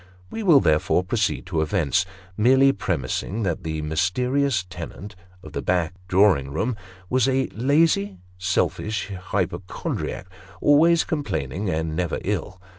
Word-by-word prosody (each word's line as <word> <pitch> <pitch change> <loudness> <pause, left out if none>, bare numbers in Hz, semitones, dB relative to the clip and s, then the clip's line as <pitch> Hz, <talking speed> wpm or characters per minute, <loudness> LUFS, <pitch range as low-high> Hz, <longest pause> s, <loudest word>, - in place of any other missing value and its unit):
We 225 - -4
will 170 -9 +6
therefore 80 -1 +2
proceed 100 0 -1
to 85 -4 -1
events, 85 +2 +1 0.3
merely 130 +6 +5
premising 95 - -2
that 95 0 -1
the 80 -1 -3
mysterious 110 - +1
tenant 95 +3 -8 0.3
of - - -11
the - - -2
back 90 -1 0
drawing 90 -8 +3
room 115 - -1 0.3
was 130 +2 +2
a 135 0 +2
lazy, 125 - +2 0.2
selfish 95 +3 -1
hypochondriac; 90 +2 -3 0.3
always 165 +3 +5
complaining 95 - -3
and 80 -2 -2
never 90 -1 -1
ill. 95 - -3
95 Hz, 125 wpm, -23 LUFS, 85-130 Hz, 0.3 s, will